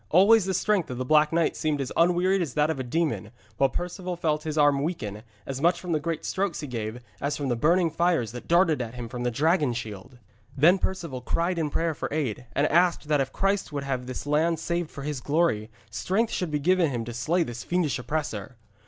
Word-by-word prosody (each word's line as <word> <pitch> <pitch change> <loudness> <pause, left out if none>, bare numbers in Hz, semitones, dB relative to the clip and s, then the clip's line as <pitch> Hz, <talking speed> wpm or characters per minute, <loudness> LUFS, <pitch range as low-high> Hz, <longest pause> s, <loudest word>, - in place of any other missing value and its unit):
Always 200 +4 +6
the 190 -1 -1
strength 205 -2 +1
of 125 - -4
the 130 - -3
Black 150 +2 +4
Knight 165 -1 +1
seemed 155 -2 -1
as 135 -2 -3
unwearied 180 +3 +3
as 150 -8 -3
that 150 +1 +3
of 150 - -4
a - - -1
demon, 160 +5 -1 0.3
while 135 - +3
Perceval 180 +4 -4
felt 155 -3 0
his 155 -1 -3
arm 145 -2 +4
weaken, 110 - -3 0.2
as 135 0 -5
much 170 +2 +3
from 180 -1 -5
the 155 - +2
great 160 +1 -3
strokes 195 -2 -1
he - - -4
gave, 120 -2 -5 0.2
as 145 +1 -1
from 140 -2 -2
the 120 - +1
burning 165 +7 +3
fires 170 - +1
that 120 0 -9
darted 170 -5 +3
at 120 0 -5
him 120 -1 -5
from 120 +1 -6
the 125 - +1
dragon 150 +1 +2
shield. 115 +1 -7 0.4
Then 170 +7 +5
Perceval 170 -10 -3
cried 170 +7 0
in 155 -2 0
prayer 165 +2 0
for - - -5
aid, 125 -5 -2
and 145 - +3
asked 170 -1 +2
that 150 -2 +3
if 135 0 -2
Christ 195 +2 0
would 140 -1 -3
have 130 -2 -3
this 130 +2 -5
land 160 +3 +2
saved 170 0 -2
for 140 - -8
His 145 -3 -3
glory, 145 -9 +1 0.2
strength 210 - 0
should 180 - -1
be 150 - 0
given 175 +2 +3
him 120 -4 -3
to 120 - -6
slay 160 +10 +1
this 120 -5 -6
fiendish 175 -7 0
oppressor. 125 -6 -4
150 Hz, 230 wpm, -26 LUFS, 130-175 Hz, 0.4 s, Always